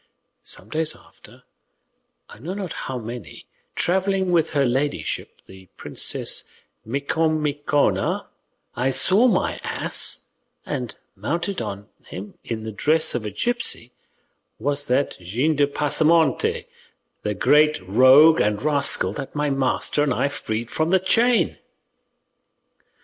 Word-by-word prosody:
Some -, -, -1 dB
days 160 Hz, 0 st, +1 dB
after, -, -, -17 dB, 0.8 s
I -, -, -14 dB
know 170 Hz, -, -6 dB
not 195 Hz, -4 st, -5 dB
how 130 Hz, -, -5 dB
many, 120 Hz, 0 st, -9 dB, 0.3 s
travelling 190 Hz, +1 st, 0 dB
with 170 Hz, -3 st, +2 dB
her 140 Hz, -3 st, +1 dB
ladyship 135 Hz, +4 st, -2 dB
the 95 Hz, 0 st, -15 dB
Princess -, -, 0 dB, 0.3 s
Micomicona, 145 Hz, +2 st, 0 dB, 0.5 s
I 125 Hz, +2 st, 0 dB
saw 190 Hz, -, +4 dB
my 235 Hz, -, 0 dB
ass, -, -, +2 dB, 0.4 s
and 125 Hz, -5 st, -4 dB, 0.2 s
mounted 170 Hz, -, -3 dB
upon 100 Hz, +1 st, -6 dB, 0.2 s
him, 100 Hz, +3 st, -8 dB
in 110 Hz, -2 st, -5 dB
the 110 Hz, -, -5 dB
dress 155 Hz, +9 st, +1 dB
of 115 Hz, -3 st, -3 dB
a -, -, -2 dB
gipsy, 125 Hz, -, 0 dB, 0.7 s
was 145 Hz, +4 st, -2 dB
that 130 Hz, +3 st, 0 dB
Gines 125 Hz, -, -1 dB
de 145 Hz, -1 st, +3 dB
Pasamonte, 150 Hz, +1 st, +1 dB, 0.6 s
the 105 Hz, -1 st, -3 dB
great 150 Hz, +8 st, +3 dB
rogue 130 Hz, -, +6 dB
and 105 Hz, 0 st, 0 dB
rascal 145 Hz, -2 st, +2 dB
that 140 Hz, 0 st, -7 dB
my 145 Hz, -1 st, 0 dB
master 135 Hz, +2 st, 0 dB
and 140 Hz, -4 st, +1 dB
I 140 Hz, -, 0 dB
freed 115 Hz, -5 st, -4 dB
from 160 Hz, +1 st, -1 dB
the 190 Hz, +1 st, +4 dB
chain." 230 Hz, +6 st, +2 dB
145 Hz, 125 wpm, -22 LUFS, 120-160 Hz, 0.8 s, rogue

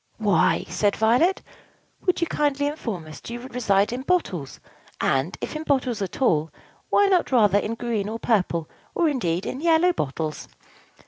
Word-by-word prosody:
"Why," 210 Hz, -4 st, +2 dB
said 205 Hz, -1 st, +1 dB
Violet, 245 Hz, -, +2 dB, 0.6 s
"would 365 Hz, -, +2 dB
you -, -, +3 dB
kindly 290 Hz, -3 st, 0 dB
inform 230 Hz, -, -4 dB
us, 155 Hz, 0 st, -11 dB
do 235 Hz, -, -8 dB
you -, -, -6 dB
reside 225 Hz, -5 st, +1 dB
in 250 Hz, -, -3 dB
bottles; 230 Hz, -, -1 dB, 0.4 s
and, 135 Hz, +6 st, 0 dB
if -, -, -5 dB
in 310 Hz, -, -3 dB
bottles 260 Hz, -7 st, 0 dB
at 195 Hz, +7 st, -3 dB
all, 160 Hz, -9 st, +2 dB, 0.4 s
why 405 Hz, -, +4 dB
not, 375 Hz, -6 st, +2 dB
rather, 210 Hz, -5 st, +4 dB
in 220 Hz, +2 st, -3 dB
green 230 Hz, -4 st, -2 dB
or 225 Hz, -, -4 dB
purple, 180 Hz, -9 st, 0 dB, 0.3 s
or, 340 Hz, -, +3 dB
indeed, 190 Hz, -, -1 dB
in 265 Hz, -, -4 dB
yellow 340 Hz, +2 st, +4 dB
bottles?" 155 Hz, -, -3 dB
230 Hz, 170 wpm, -24 LUFS, 195-290 Hz, 0.6 s, why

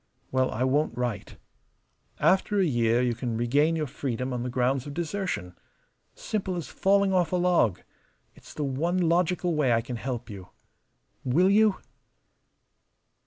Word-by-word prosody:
Well, 130 Hz, 0 st, +1 dB
I 120 Hz, -, -2 dB
won't 130 Hz, -1 st, +1 dB
write. 120 Hz, -5 st, -4 dB, 0.8 s
After 195 Hz, +2 st, +2 dB
a 190 Hz, -, +3 dB
year 120 Hz, -4 st, +2 dB
you 120 Hz, -1 st, +1 dB
can 115 Hz, -1 st, -3 dB
regain 145 Hz, +8 st, +2 dB
your 155 Hz, -2 st, -1 dB
freedom 125 Hz, -1 st, -4 dB
on 125 Hz, -, -3 dB
the 125 Hz, -, -3 dB
grounds 125 Hz, +2 st, 0 dB
of 145 Hz, -, -7 dB
desertion. 170 Hz, -, -3 dB, 0.6 s
Simple 190 Hz, -4 st, -3 dB
as 170 Hz, -4 st, -5 dB
falling 200 Hz, 0 st, +2 dB
off 180 Hz, -2 st, +2 dB
a -, -, +1 dB
log. 175 Hz, -, +2 dB, 0.5 s
It's -, -, -15 dB
the 150 Hz, -, -2 dB
one 150 Hz, +7 st, -1 dB
logical 175 Hz, 0 st, +1 dB
way 150 Hz, -5 st, +2 dB
I 115 Hz, -, +2 dB
can 120 Hz, +1 st, -6 dB
help 120 Hz, -1 st, -5 dB
you. 95 Hz, -5 st, -10 dB, 0.7 s
Will 175 Hz, +10 st, +3 dB
you?" 210 Hz, -1 st, +4 dB
140 Hz, 155 wpm, -27 LUFS, 120-180 Hz, 0.8 s, you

